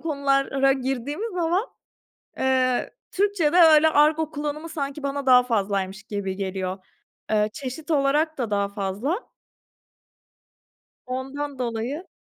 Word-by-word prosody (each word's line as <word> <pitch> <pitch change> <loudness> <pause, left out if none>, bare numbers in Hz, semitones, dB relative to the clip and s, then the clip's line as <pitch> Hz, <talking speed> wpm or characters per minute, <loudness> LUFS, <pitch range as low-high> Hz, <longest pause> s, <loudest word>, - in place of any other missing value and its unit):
konulara 275 -3 +1
girdiğimiz 270 - -3
zaman, 350 +4 +1 0.7
eee, 255 -1 +1 0.2
Türkçede 380 -5 +1
öyle 320 -2 +7
argo 310 +1 +3
kullanımı 300 +2 -4
sanki 280 -2 -4
bana 280 0 -3
daha 250 -1 +7
fazlaymış 200 -4 -1
gibi 195 -2 -4
geliyor. 190 -1 -3 0.5
Eee, 210 0 +2
çeşit 300 +3 -6
olarak 295 +2 +2
da 235 -4 -2
daha 200 -1 +1
fazla. 205 - -3 1.8
Ondan 270 +2 -5
dolayı 250 +7 -3
275 Hz, 110 wpm, -24 LUFS, 230-310 Hz, 1.8 s, öyle